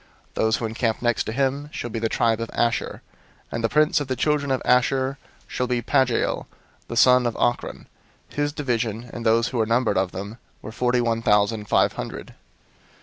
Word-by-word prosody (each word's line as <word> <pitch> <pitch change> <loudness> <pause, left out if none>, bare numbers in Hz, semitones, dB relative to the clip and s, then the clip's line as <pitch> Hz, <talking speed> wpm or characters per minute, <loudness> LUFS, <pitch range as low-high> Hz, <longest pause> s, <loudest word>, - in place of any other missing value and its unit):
002:027 - - -37
"Those 110 0 +1
who 115 - -3
encamp 110 0 -1
next 120 -2 +1
to - - -3
him 140 +3 -1
shall 120 - -5
be 115 - -3
the 115 0 -1
tribe 115 0 +1
of 115 - -4
Asher: 120 0 -1 0.5
and 115 - -3
the 115 - +2
prince 150 +3 +3
of 145 - -4
the 130 - -1
children 150 0 0
of 130 -1 +1
Asher 130 +2 +2 0.3
shall 125 - -2
be 120 -1 -1
Pagiel 130 -4 +1 0.4
the 115 - -5
son 125 0 +5
of 115 - -3
Ochran. 120 - -1 0.5
002:028 - - -16
His 145 0 0
division, 120 -5 -2
and 120 - -6
those 115 +1 +3
who 125 - -3
were 110 - +1
numbered 115 -4 +2
of 95 -1 -1
them, 100 +5 -7 0.2
were 110 - -7
forty 125 +1 +1
one 115 -1 0
thousand 105 0 +2
and 105 - -11
five - - +3
hundred. - - -7
120 Hz, 205 wpm, -23 LUFS, 115-130 Hz, 0.5 s, son